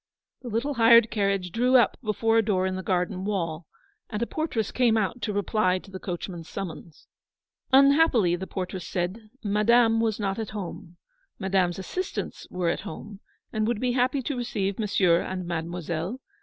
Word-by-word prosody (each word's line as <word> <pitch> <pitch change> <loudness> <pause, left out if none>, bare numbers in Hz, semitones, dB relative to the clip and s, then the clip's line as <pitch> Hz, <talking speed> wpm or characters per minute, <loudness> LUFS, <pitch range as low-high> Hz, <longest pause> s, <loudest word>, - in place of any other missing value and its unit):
The 250 - -9
little 235 +6 -1
hired 230 -1 +6
carriage 195 -3 0
drew 250 +6 +2
up 240 - +3
before 225 0 +2
a - - +3
door 190 -3 +1
in 190 0 -1
the 190 - -3
garden 180 0 -1
wall, 170 -6 -2 0.4
and 210 - -3
a 235 - 0
portress 240 -8 -2
came 240 -3 +3
out 220 +3 -1
to 215 - -1
reply 205 -2 +1
to 195 +1 -12
the 190 - -7
coachman's 175 -2 -6
summons. 170 -4 -7 0.7
Unhappily, 275 - +5
the 190 +2 -6
portress 185 -2 -5
said, 190 +5 -3
Madame 225 +2 +4
was 225 -2 0
not 195 0 -1
at 220 - -3
home. 175 -2 -7 0.4
Madame's 190 -2 +1
assistants 365 - -5
were 180 -2 -1
at - - -1
home, 200 +5 -8 0.3
and 215 0 0
would 235 -2 0
be 250 +1 0
happy 255 +2 +1
to 280 - -2
receive 210 -5 -2
Mon 215 - 0
sieur 180 -4 +3
and 185 -1 -4
Mademoiselle. 170 +4 -3
205 Hz, 175 wpm, -26 LUFS, 180-230 Hz, 0.7 s, hired